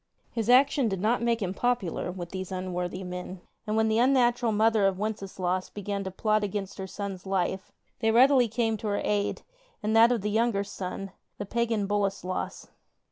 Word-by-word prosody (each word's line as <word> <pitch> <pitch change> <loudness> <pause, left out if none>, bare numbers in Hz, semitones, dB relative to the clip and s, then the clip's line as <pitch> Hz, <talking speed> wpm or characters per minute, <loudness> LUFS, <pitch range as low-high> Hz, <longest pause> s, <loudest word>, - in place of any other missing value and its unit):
Flis 225 -1 -1
action 270 +1 +5
did 195 -3 -2
not 225 +5 +1
make 235 -2 +1
him 185 -1 -2
pop 245 +2 +1
ular 180 0 -4
with 175 -2 -7
these 190 0 -5
unworthy 185 0 -3
men, 180 0 -6 0.3
and 215 +1 0
when 220 0 +3
the 220 +1 +2
unnatural 245 -2 +3
mother 215 -1 +3
of 190 -1 -1
Wenceslaus 190 -3 -2
began 200 -1 -4
to 190 - -4
plot 215 +3 +1
against 195 -1 -4
her 190 - -4
son's 195 -1 -6
life 190 0 -1 0.3
they 225 - +2
readily 250 +2 +5
came 225 0 0
to 215 - -5
her 205 -1 0
aid 205 -1 -1 0.4
and 215 +1 +1
that 230 +2 +7
of 235 -4 +1
the 210 +1 -2
younger 220 -2 +1
son, 195 0 -6 0.3
the 205 - -4
pagan 225 -1 0
Boleslas. 195 -2 -2
205 Hz, 190 wpm, -28 LUFS, 190-225 Hz, 0.4 s, that